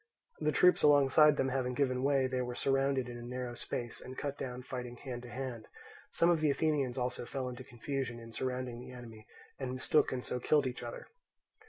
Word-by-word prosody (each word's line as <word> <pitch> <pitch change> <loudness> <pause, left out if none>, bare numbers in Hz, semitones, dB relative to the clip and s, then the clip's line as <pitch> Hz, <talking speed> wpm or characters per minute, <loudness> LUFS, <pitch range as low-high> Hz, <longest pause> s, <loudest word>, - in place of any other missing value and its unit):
The 150 - +2
troops 180 +5 +5
alongside 145 +1 +6
them 135 - +1
having 125 -1 -1
given 130 -2 +1
way, 135 -1 +3
they 130 0 -1
were 125 -1 -3
surrounded 135 -1 +1
in 120 0 -7
a - - -8
narrow 125 0 -4
space 120 0 -4
and 130 - -9
cut 140 -1 -3
down 125 -2 -5
fighting 125 -2 -5
hand 125 -2 -6
to 120 - -10
hand; 120 -3 -5 0.4
some 170 +1 +3
of 165 -2 +2
the 155 - +3
Athenians 140 -3 +1
also 125 -1 -1
fell 130 +1 -4
into 125 -1 -6
confusion 120 0 -4
in 115 0 -10
surrounding 125 0 -3
the 125 - -9
enemy 115 -3 -11 0.3
and 130 -2 -3
mistook 145 +3 +2
and 125 -1 -3
so 125 - -2
killed 145 +2 +3
each 125 -1 -3
other. 120 -1 -6
130 Hz, 205 wpm, -33 LUFS, 125-140 Hz, 0.4 s, alongside